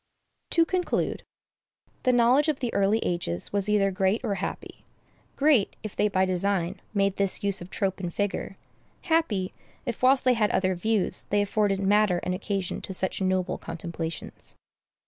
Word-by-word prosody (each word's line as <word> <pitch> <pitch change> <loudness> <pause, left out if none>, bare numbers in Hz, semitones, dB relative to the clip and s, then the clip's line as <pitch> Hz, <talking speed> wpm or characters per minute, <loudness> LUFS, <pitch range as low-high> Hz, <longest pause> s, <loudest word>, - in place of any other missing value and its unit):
To 335 -1 +4
conclude, 360 +1 -1 0.8
the 255 - +3
knowledge 250 +5 +4
of 305 -3 0
the 245 -3 -2
early 200 +2 +3
ages 170 - -1
was 200 0 +1
either 200 -2 +3
great 190 +3 +1
or 215 -5 0
happy; 195 0 -5 0.5
great, 280 -8 +3
if 215 - -6
they 210 - +2
by 190 -2 +2
design 185 0 0
made 195 -2 +1
this 200 +1 0
use 200 -2 0
of 175 - -8
trope 195 -2 -1
and 175 -2 -3
figure; 205 0 -2 0.5
happy, 315 - +1 0.3
if, 240 -4 -4
whilst 260 +1 +5
they 255 - +4
had 215 -3 +2
other 185 0 +1
views, 205 +2 0
they 205 0 +3
afforded 205 -1 +1
matter 200 -2 +3
and 180 - -1
occasion 195 -1 -3
to 190 - -5
such 190 +1 -2
noble 185 -1 0
contemplations. 165 -1 -5
200 Hz, 165 wpm, -27 LUFS, 185-220 Hz, 0.8 s, whilst